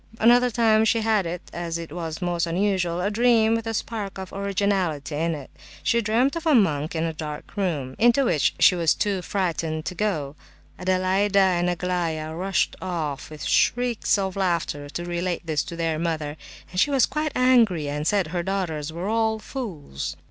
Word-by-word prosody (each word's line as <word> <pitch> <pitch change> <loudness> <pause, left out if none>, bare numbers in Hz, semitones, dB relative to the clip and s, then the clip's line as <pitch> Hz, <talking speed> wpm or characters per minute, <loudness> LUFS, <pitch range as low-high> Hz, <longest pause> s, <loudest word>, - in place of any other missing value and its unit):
Another 245 +2 +5
time 220 -2 +3
she 225 +1 +2
had—it 170 -5 -2
was 165 +1 -5
most 175 -1 0
unusual—a 180 0 0
dream 225 0 +4
with 230 0 -1
a 225 - -2
spark 210 -3 -4
of 190 -1 -7
originality 195 -7 -1
in 165 +2 0
it. 140 -3 -10 0.3
She 235 - +2
dreamt 235 +7 +2
of 335 0 -3
a 305 - +5
monk 155 - +2
in 160 - 0
a 165 -1 -1
dark 150 -1 -7
room, 155 -10 -2
into 240 +4 +4
which 155 - +2
she - - +6
was 170 -3 +2
too 200 -3 -1
frightened 165 -5 -2
to 185 - -3
go. 160 -9 -2 0.4
Adelaida 185 +2 +1
and 180 -2 +3
Aglaya 170 -3 -2
rushed 185 +2 0
off 160 -6 -3
with 155 -1 -9
shrieks 245 -3 +2
of 190 -2 -2
laughter 170 -6 -1
to 175 +3 -5
relate 175 0 -2
this 155 -3 0
to 170 - -7
their 165 -2 -1
mother, 160 -3 -2 0.4
but 180 - -2
she 290 - +4
was 275 -3 +4
quite 305 -1 -2
angry, 230 - +4
and 150 +2 -2
said 200 -3 +2
her 175 +1 -1
daughters 170 -5 -2
were 170 +4 -4
all 220 0 +1
fools. 190 - -6
180 Hz, 175 wpm, -24 LUFS, 165-215 Hz, 0.4 s, she